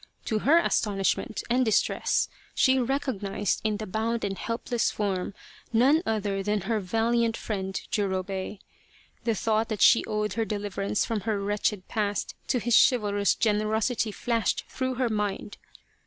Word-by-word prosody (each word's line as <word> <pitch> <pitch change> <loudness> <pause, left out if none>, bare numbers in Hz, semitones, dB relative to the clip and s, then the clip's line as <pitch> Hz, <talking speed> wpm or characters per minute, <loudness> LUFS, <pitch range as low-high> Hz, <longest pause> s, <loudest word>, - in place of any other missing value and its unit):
To 220 -2 0
her 295 +9 +5
astonishment 210 - 0
and 250 +2 +2
distress 220 -4 +1 0.3
she 260 0 +4
recognized 230 -7 -1
in 215 -1 0
the 215 - -5
bound 225 +4 -2
and 195 -1 -1
helpless 230 +3 -1
form 195 -2 -2 0.4
none 265 +8 +4
other 205 -3 -1
than 210 +1 0
her 220 +4 -1
valiant 225 +4 +1
friend 190 -3 -3
Jurobei. 190 0 -2 0.7
The 230 -2 +1
thought 220 +2 0
that 215 -3 0
she 235 - +6
owed 210 -2 -1
her 225 - 0
deliverance 205 -1 -2
from 225 -2 -1
her 210 -2 +1
wretched 205 -1 -1
past 205 -2 -2
to - - +1
his 240 0 -1
chival 210 -5 +4
rous 205 0 +2
generosity 220 +1 +1
flashed 230 -1 -1
through 260 -1 -3
her 250 -1 0
mind. 210 -1 -3
215 Hz, 150 wpm, -27 LUFS, 200-230 Hz, 0.7 s, she